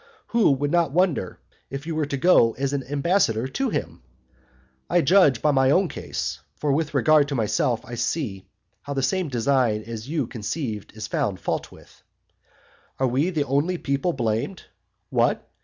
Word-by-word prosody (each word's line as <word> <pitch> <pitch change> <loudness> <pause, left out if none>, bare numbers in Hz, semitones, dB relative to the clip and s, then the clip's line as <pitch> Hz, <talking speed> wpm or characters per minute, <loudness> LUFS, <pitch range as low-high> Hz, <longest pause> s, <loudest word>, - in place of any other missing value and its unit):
Who 235 -3 +4
would 145 +2 -1
not 170 -4 +2
wonder 170 - 0 0.3
if 135 +1 -6
you 165 - -3
were 155 -2 -1
to 140 - -2
go 130 -7 +5
as 135 +1 -2
an 140 -2 -1
ambassador 140 - +1
to 270 - -1
him? - - -4 0.9
I 175 0 +4
judge 155 -5 +4
by 150 - +4
my 135 -1 +3
own 180 +5 +3
case, - - -4 0.2
for 150 - -1
with 150 +1 -1
regard 150 +1 +4
to 140 - -3
myself 115 +1 0
I 120 - -10
see 120 - -3 0.3
how 140 0 -6
the 135 - 0
same 175 +5 0
design 120 -3 +1
as 115 +2 -7
you 155 -4 0
conceived 115 -1 -5
is 110 - -4
found 100 -4 -1
fault - - -3
with. - - -18 1.0
And 130 - +2
are 125 - 0
we 140 +8 +1
the 160 -5 0
only 145 +7 0
people 140 +3 -1
blamed? 120 - -2 0.5
What? - - +1
140 Hz, 175 wpm, -24 LUFS, 120-160 Hz, 1.0 s, go